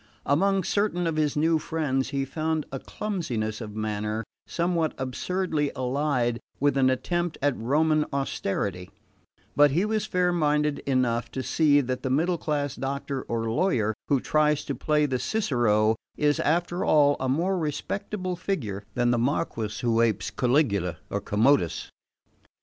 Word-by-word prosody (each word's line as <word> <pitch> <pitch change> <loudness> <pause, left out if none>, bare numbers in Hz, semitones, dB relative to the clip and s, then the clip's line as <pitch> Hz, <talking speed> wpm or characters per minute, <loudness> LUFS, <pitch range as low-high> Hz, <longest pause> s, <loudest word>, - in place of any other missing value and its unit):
Among 195 +7 +2
certain 200 -2 0
of 165 -1 0
his 150 -2 0
new 160 +1 +3
friends 145 -5 -1
he 135 -1 -1
found 155 +2 -2
a 135 - -4
clumsiness 120 - -3
of 105 -2 -7
manner 110 0 -2 0.2
somewhat 170 -2 0
absurdly 150 +3 -1
allied 125 -2 0 0.2
with 145 0 +2
an 130 -1 +4
attempt 175 +6 -1
at 145 -2 +1
Roman 155 +5 +2
austerity; 100 -9 -2 0.7
but 145 0 +6
he 170 +9 +1
was 215 0 -1
fair 180 -1 +1
minded 150 -3 +1
enough 120 -3 +1
to 130 - -3
see 145 +3 +3
that 130 -1 -3
the 130 - -2
middle 165 +6 +1
class 145 -3 -1
doctor 140 0 -3
or 115 -1 -2
lawyer 115 - +1
who 140 - +3
tries 150 +1 +1
to - - -2
play 150 -1 +1
the 130 -3 -1
Cicero 115 - +2 0.2
is, 145 -1 +2
after 175 +3 0
all, 145 -2 +4
a 130 - -1
more 175 +7 +1
respectable 185 +4 -3
figure 125 - -3
than 120 0 +2
the 120 - +2
Marquess 115 -5 -1
who 115 -1 +2
apes 115 -2 +1
Caligula 105 - +1
or - - -1
Commodus. 105 - +1
145 Hz, 150 wpm, -26 LUFS, 120-160 Hz, 0.7 s, but